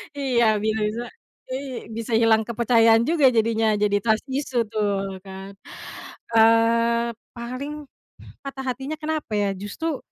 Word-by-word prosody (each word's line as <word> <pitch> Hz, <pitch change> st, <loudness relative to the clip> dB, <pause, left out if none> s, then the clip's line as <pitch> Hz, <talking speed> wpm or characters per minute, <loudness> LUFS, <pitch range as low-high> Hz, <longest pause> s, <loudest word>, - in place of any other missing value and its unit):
Iya, 255 Hz, -4 st, +1 dB, 0.2 s
bisa-bisa 220 Hz, +1 st, -1 dB, 0.4 s
i 260 Hz, -1 st, -6 dB
bisa 225 Hz, 0 st, -1 dB
hilang 225 Hz, -1 st, +4 dB
kepercayaan 230 Hz, -1 st, +4 dB
juga 300 Hz, -5 st, +4 dB
jadinya. 225 Hz, -2 st, +1 dB
Jadi 205 Hz, -1 st, +1 dB
trust 220 Hz, -1 st, +1 dB
issue 260 Hz, -3 st, -1 dB
tuh, 200 Hz, -3 st, -2 dB
kan. 195 Hz, 0 st, -10 dB, 0.8 s
Eee, 230 Hz, +1 st, +4 dB, 0.2 s
paling 265 Hz, +5 st, -6 dB, 0.6 s
patah 275 Hz, -1 st, -6 dB
hatinya 265 Hz, +4 st, -3 dB
kenapa 310 Hz, -6 st, -3 dB
ya, 205 Hz, -1 st, +1 dB
justru, 275 Hz, -, -4 dB
230 Hz, 120 wpm, -23 LUFS, 215-260 Hz, 0.8 s, hilang